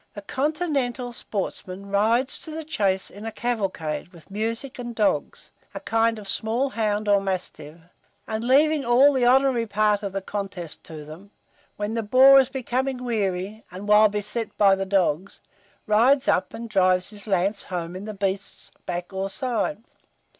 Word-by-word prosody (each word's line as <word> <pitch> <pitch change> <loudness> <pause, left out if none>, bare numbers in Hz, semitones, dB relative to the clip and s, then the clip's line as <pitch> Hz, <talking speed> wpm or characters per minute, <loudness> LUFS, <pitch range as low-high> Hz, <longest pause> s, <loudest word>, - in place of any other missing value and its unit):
The 205 - -8
continental 270 - -1
sportsman 195 -3 -4
rides 230 +6 +3
to - - -6
the 320 +1 -5
chase 200 -11 -1
in 205 +2 -11
a 225 - -4
cavalcade, 195 -12 -3
with 175 +1 -18
music 230 +6 -3
and 240 -1 -6
dogs, 210 -2 -1 0.2
a - - -3
kind 225 0 +1
of 210 -2 -9
small 230 +7 0
hound 215 -2 -1
or 200 -1 +4
mastiff, 180 -5 -4 0.5
and 220 0 -3
leaving 290 +4 +3
all 260 +4 +5
the 255 -2 +2
honorary 255 -2 +3
part 210 0 +2
of 200 -2 -4
the 195 - -2
contest 190 -6 -5
to 155 -2 -9
them, 165 +7 -12 0.5
when 210 +1 -3
the 230 - -1
boar 260 +5 +7
is 265 -1 +2
becoming 260 0 -2
weary, 205 -2 -2
and 190 +3 -8
while 210 +1 +6
beset 210 +2 -3
by 200 -1 +6
the 195 0 -1
dogs, 190 -2 0 0.5
rides 255 +6 +4
up, 185 0 +2
and 230 +1 -6
drives 185 -3 +2
his 210 0 -8
lance 195 +1 0
home 175 -1 -5
in 190 +2 -7
the 215 -1 -6
beast's 195 0 -3 0.2
back 175 +1 -4
or 190 +1 -2
side. 240 +1 -2
210 Hz, 170 wpm, -24 LUFS, 195-245 Hz, 0.5 s, boar